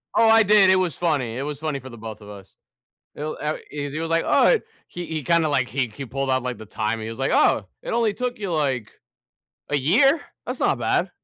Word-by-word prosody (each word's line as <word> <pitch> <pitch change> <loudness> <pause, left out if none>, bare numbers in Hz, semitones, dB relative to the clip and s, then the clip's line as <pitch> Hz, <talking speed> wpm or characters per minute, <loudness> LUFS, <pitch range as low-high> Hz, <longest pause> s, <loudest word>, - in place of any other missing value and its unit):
Oh, 225 - +5
I 225 0 +7
did 205 -2 +6
it 190 - +6
was 180 -6 0
funny, 135 -9 -1
it 135 - -3
was 145 -1 -5
funny 155 -3 -3
for 130 +1 -11
the 120 - -11
both 110 -1 -8
of 105 - -12
us. 100 -2 -12 0.6
He'll 155 +1 -5
eh, 150 +1 -1 0.2
e 145 -1 -4
he 145 +3 -5
was, 165 0 -3
like, 165 0 +2
"Oh, - - +4
eh" 480 - +5 0.3
he 175 0 -6
he 155 -2 -4
kinda, 170 -1 +2
like, 130 -4 +1
he 130 +1 -1
he 140 - -6
pulled 135 +1 -3
out, 130 -1 +1
like, 125 -1 -4
the 110 - -10
time, 110 +1 -2
he 110 - -5
was 115 - -7
like, 135 - 0
"Oh, 100 - +3 0.2
it - - -5
only 230 -2 +1
took 250 0 -3
you, 195 -4 -3
like, 135 -8 -1 0.8
a 145 - +2
year. 260 - +4 0.3
That's - - -4
not - - +2
bad. - - 0
145 Hz, 250 wpm, -23 LUFS, 125-175 Hz, 0.8 s, I